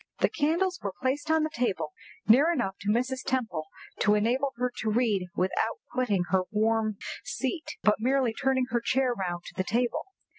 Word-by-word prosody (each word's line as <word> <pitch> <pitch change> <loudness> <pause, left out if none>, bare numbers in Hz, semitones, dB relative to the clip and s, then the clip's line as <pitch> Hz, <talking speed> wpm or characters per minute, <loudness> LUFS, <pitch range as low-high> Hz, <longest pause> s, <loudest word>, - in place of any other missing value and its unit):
The - - +3
candles 350 +5 +1
were 200 -2 -4
placed 285 +4 -1
on 320 0 +4
the 310 - -1
table 185 -11 -1 0.4
near 275 +10 +6
enough 215 - -1
to 200 - -3
Mrs. 255 +4 +1
Temple 230 -12 -1 0.3
to 210 +1 +4
enable 245 +6 +1
her 250 0 0
to 220 - 0
read 215 -5 +1
without 190 +4 0
quitting 215 -8 +1
her 190 -1 +4
warm 220 0 +1 0.3
seat, 285 +4 -3
but 210 - +4
merely 255 0 +2
turning 260 +1 +1
her 235 0 +1
chair 255 +1 +2
round 175 -5 -3
to - - -9
the 185 - 0
table. 235 +5 0
240 Hz, 180 wpm, -28 LUFS, 210-265 Hz, 0.4 s, near